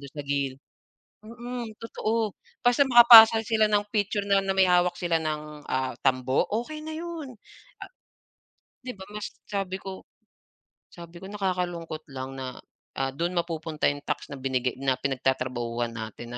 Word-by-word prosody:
do'n 140 -1 -11
sa 145 - -6
gilid, 140 -1 -2 0.6
mm, 240 +1 -6
totoo 225 -2 -2 0.3
basta 245 +3 +5
makapasa 235 -2 +10
sila 220 -2 +3
ng 205 0 +3
picture 205 -1 0
na 200 0 +4
na 195 - 0
may 190 -1 +5
hawak 180 0 +3
sila 170 -2 +1
ng, 150 -1 -5
ah, 130 -1 -1
tambo, 130 +2 +2 0.2
okey 305 +4 -8
na 315 - -6
'yun. 330 -5 -6 0.5
Ah - - -8 1.0
'di 250 - -4
ba - - -14
mas 210 -1 -5 0.2
sabi 195 -2 -2
ko 190 -1 -8 0.9
sabi 170 0 -11
ko - - -9
nakakalungkot 180 -5 -3
lang 130 0 -6
na, 130 -1 -6 0.4
ah, 135 0 0
do'n 170 +6 -2
mapupunta 160 -2 -1
'yung 145 0 -8
tax - - -3
na - - -7
binigay 130 -1 -1
na 135 -1 +2
pinagtatrabahuhan 125 -3 -1
natin, 115 +2 -7
170 Hz, 155 wpm, -26 LUFS, 135-210 Hz, 1.0 s, makapasa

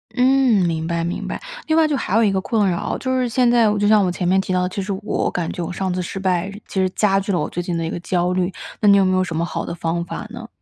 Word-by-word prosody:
嗯， 250 -6 +4
明 160 -1 -2
白， 170 -1 -1
明 170 - -3
白。 - - -5 0.3
另 315 0 +2
外 320 -1 +5
就 295 - 0
还 210 - -2
有 230 - +4
一 205 - +3
个 190 -1 0
困 210 -2 +1
扰， 170 - -2
就 260 0 -1
是 250 -1 0
现 245 +1 +3
在 240 -1 +4
就 205 0 +2
像 215 -1 +5
我 180 - +1
前 180 0 -2
面 190 +2 +3
提 190 - -5
到 180 0 +1
的， 180 - -1
其 195 - -4
实 195 +2 -4
我 - - -1
感 170 -2 -2
觉 175 - -4
我 - - -5
上 185 +1 -2
次 180 - -2
失 185 +2 -5
败 185 0 0 0.2
其 190 - -1
实 185 - +2
加 195 0 +2
剧 195 +1 -3
了 180 - +1
我 - - -2
最 175 - -3
近 175 -1 -2
的 165 - -2
一 - - -3
个 - - -4
焦 180 0 0
虑， 185 0 0 0.3
那 210 - +3
你 200 - +7
有 195 - +4
没 185 0 +2
有 185 - +2
什 170 -3 -5
么 170 +1 0
好 - - -4
的 - - -5
方 170 0 -2
法 175 - -6
呢？ 235 0 -9
190 Hz, 345 characters per minute, -20 LUFS, 175-220 Hz, 0.3 s, 你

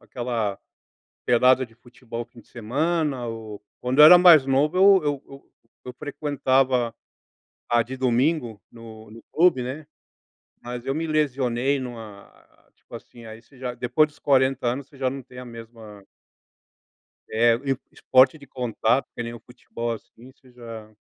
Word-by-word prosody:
aquela 115 -5 -4 0.7
pelada 125 +2 +4
de 115 - -24
futebol 120 0 -9
fim 120 - -18
de - - -26
semana 140 +3 -2
ou 110 -2 -8 0.2
quando 125 +2 -2
eu 150 - +10
era 180 +4 +10
mais 170 -6 +7
novo 140 +5 +1
eu 195 -3 +6
eu 145 -2 -2
eu 135 0 -15 0.3
eu 125 - -7
frequentava 130 -4 0 0.7
a 120 0 +3
de 130 +3 -7
domingo 125 - 0
no 110 -2 -13
no 115 +2 -14
clube, 165 -7 +3
né, 145 +5 -7 0.7
mas 120 0 -7
eu 135 - -1
me 160 +2 -3
lesionei 135 -3 0
numa, 115 -5 -9 0.5
tipo - - -23
assim 120 -1 -13
aí 110 0 -11
você 130 +3 -23
já 125 -1 -5
depois 125 +6 +1
dos 150 - -23
40 130 -2 +1
anos 130 +3 -3
você 140 - -19
já 130 -1 0
não 135 0 -7
tem 125 - -16
a 125 - -9
mesma 115 -3 -12 1.3
É 115 +1 +3
e 135 +2 -2
esporte 130 +4 +3
de 140 - -15
contato 125 0 -1
que - - -5
nem 115 0 -6
o 120 - -10
futebol, 120 -1 -6
assim, 120 +3 -12
você 130 -1 -23
já 115 -3 -11
125 Hz, 160 wpm, -23 LUFS, 115-140 Hz, 1.3 s, eu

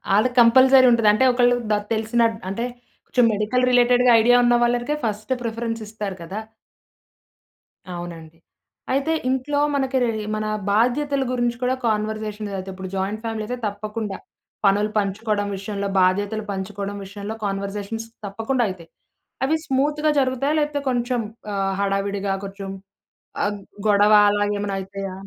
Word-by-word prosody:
ఆళ్ళక్కంపల్సరీ 255 +3 +6
ఉంటది. 230 -2 +3
అంటే, 240 +5 +2
ఒకళ్ళు 245 0 +4 0.2
డ - - +4 0.2
తెలిసిన 225 +2 0 0.3
అంటే, 230 +5 -2 0.4
కొంచుం 245 -2 +3
మెడికల్ 215 +5 0
రిలేటెడ్‌గా 245 0 +5
ఐడియా 245 +2 +5
ఉన్న 240 0 +4
వాళ్ళర్‌‌‌‌‌‌‌‌‌‌‌‌‌‌‌‌‌‌‌‌‌‌‌కే 240 +5 +1
ఫస్ట్ 215 +2 -4
ప్రిఫరెన్సిస్తారు 225 -3 -4
కదా! 190 +6 -5 1.6
అవునండి. 165 -2 -8 0.6
అయితే, 280 +4 +1 0.2
ఇంట్లో 265 +3 0 0.2
మనకి 265 -1 0
రే 235 - +1 0.3
మన 215 0 -2 0.3
బాధ్యతలు 265 +6 +1
గురించి 240 -1 0
కూడా 255 +1 +1
కాన్వర్జేషన్సయితయి. 210 -2 -3
ఇప్పుడు 190 0 -7
జాయింట్ 195 +3 -2
ఫ్యామిలీ 225 -1 -3
అయితే 250 +2 -3
తప్పకుండా. 210 0 -5 0.5
పనులు 205 +2 +3
పంచుకోడం 205 +1 -1
విషయంలో, 200 0 -4
బాధ్యతలు 205 +4 +1
పంచుకోడం 200 +1 -4
విషయంలో, 200 +2 -6
కాన్వర్జేషన్స్ 200 +3 -4 0.2
తప్పకుండా 225 +6 -1
అయితయి. 170 -3 -9 0.6
అవి 310 - +2
స్మూత్‌గా 300 +3 +1
జరుగుతాయా? 265 +3 0
లేకపోతే 295 -1 -1
కొంచం 245 -1 0 0.3
ఆహ్, 195 -1 0
హడావిడిగా 195 0 -1
కొంచం 195 0 -7 0.7
ఆహ్, 205 0 -2 0.3
గొడవ 205 +1 +5 0.2
అలాగేమనయితయా? 200 -1 -2
215 Hz, 120 wpm, -22 LUFS, 200-245 Hz, 1.6 s, ఆళ్ళక్కంపల్సరీ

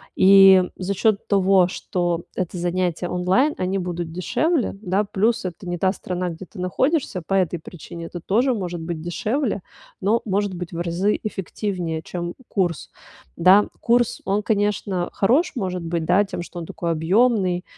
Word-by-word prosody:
И 195 -1 +8
за 195 +2 -2
счёт 210 +1 +1
того, 190 -2 +4
что 175 -2 -2
это 185 -1 -3
занятия 175 0 -1
онлайн, 185 +12 +2
они 185 +1 -1
будут 175 -2 -4
дешевле, 250 - 0
да, 195 +1 +1
плюс 220 +3 0
это 180 +1 -6
не 175 - -2
та 190 -1 +3
страна, 180 -2 -3
где 165 +3 -8
ты 190 - -13
находишься, 255 - 0
по 195 - -3
этой 180 -2 +1
причине 170 +1 -9
это 175 - -7
тоже 235 +10 +1
может 180 -6 -4
быть 165 -1 -5
дешевле, 215 - -2 0.4
но 215 +5 +2
может 200 -1 0
быть 180 -1 -6
в 165 - -4
разы 175 +5 0
эффективнее, 185 -4 -3
чем 175 0 -5
курс, 175 - -1 0.5
да. 185 +4 +5
Курс, 240 0 +1
он, 205 +2 0
конечно, 205 -4 0
хорош, 260 - +2
может 185 -5 -2
быть, 165 -1 -2
да, 185 +4 +4
тем, 190 -3 -5
что 175 - -9
он 170 - -6
такой 170 -1 -3
объемный, 185 +2 +2
185 Hz, 165 wpm, -22 LUFS, 175-205 Hz, 0.5 s, И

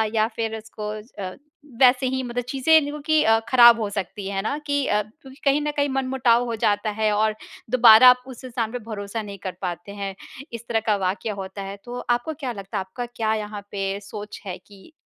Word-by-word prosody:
या 215 0 +3
फिर 225 -1 -2
उसको 215 -1 -8 0.4
अ, 185 0 -5 0.5
वैसे 255 +1 +6
ही 260 +1 -1
मतलब 245 0 -3
चीज़ें 305 +4 +4
क्योंकि 300 +1 +1 0.3
ख़राब 240 -2 +8
हो 210 - -1
सकती 200 0 -5
है 195 -1 -2
ना 250 +8 -2
कि 285 -1 +1
अ, 210 0 +2
क्योंकि 265 +5 -17
कहीं 280 +1 +3
न 295 - -1
कहीं 285 0 +2
मन-मुटाव 260 -3 +2
हो 235 -1 -3
जाता 205 +1 +2
है 215 -1 +2
और 215 0 +1 0.4
दोबारा 245 -1 +9
आप 250 0 +4
उस 260 -1 -10
इंसान 235 -3 -3
पे 245 - -4
भरोसा 205 +1 -4
नहीं 200 -2 -8
कर 185 - -3
पाते 175 +1 -5
हैं। 195 -1 -5 0.4
इस 235 0 -8
तरह 225 -1 +1
का 210 - +4
वाक्य 190 +4 -2
होता 190 +1 -7
है 195 +1 -7
तो 245 0 -6
आपको 240 +6 0
क्या 275 -4 -4
लगता 200 0 -6
है - - 0
आपका 190 +6 -6
क्या 225 -2 -2
यहाँ 210 -1 -5
पे 195 0 -2
सोच 205 +1 -9
है 185 -2 -5
कि 200 +9 -18
225 Hz, 210 wpm, -23 LUFS, 205-255 Hz, 0.5 s, दोबारा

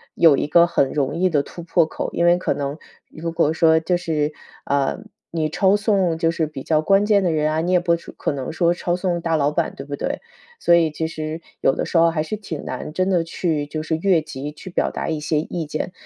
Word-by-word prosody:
有 160 -4 +6
一 145 - -1
个 170 +3 +6
很 135 -5 +1
容 140 -3 -1
易 185 +2 +2
的 145 -4 +1
突 170 - -10
破 170 -1 +2
口， - - -4
因 170 - +1
为 175 +1 +5
可 - - -1
能， 140 +2 -4 0.3
如 165 +1 -5
果 155 -1 +1
说 160 0 +4
就 175 +2 0
是， 155 -3 -1 0.3
呃， 140 +3 0 0.3
你 160 -2 -1
抄 190 +5 +3
送 195 -6 +1
就 165 0 +2
是 160 -2 -1
比 140 -3 -8
较 155 -1 +2
关 195 +4 +3
键 205 -2 +3
的 175 - +2
人 155 -1 +1
啊， 155 +1 0
你 175 - -1
也 180 - +5
不 170 -1 +2
是 170 - -10
可 - - -2
能 135 0 -4
说 170 +2 +2
抄 175 0 -1
送 180 -1 -1
大 165 -1 0
老 145 -1 +2
板， 165 +1 -1
对 135 - -8
不 145 - -4
对？ 285 - -3 0.4
所 170 - +5
以 165 -2 +3
其 160 +1 -2
实 155 0 -5 0.2
有 135 - +2
的 - - -2
时 170 - 0
候 165 0 +6
还 165 -2 -1
是 215 +7 -4
挺 170 -8 -6
难 155 - -6
真 185 +2 0
的 175 -3 +2
去 165 -3 -1
就 155 +1 -4
是 160 0 -1
越 180 -1 +3
级 145 -1 -7
去 155 - -10
表 180 - 0
达 - - -4
一 160 -1 -1
些 150 0 0
意 165 0 -4
见。 155 +4 -4
165 Hz, 275 characters per minute, -21 LUFS, 155-175 Hz, 0.4 s, 有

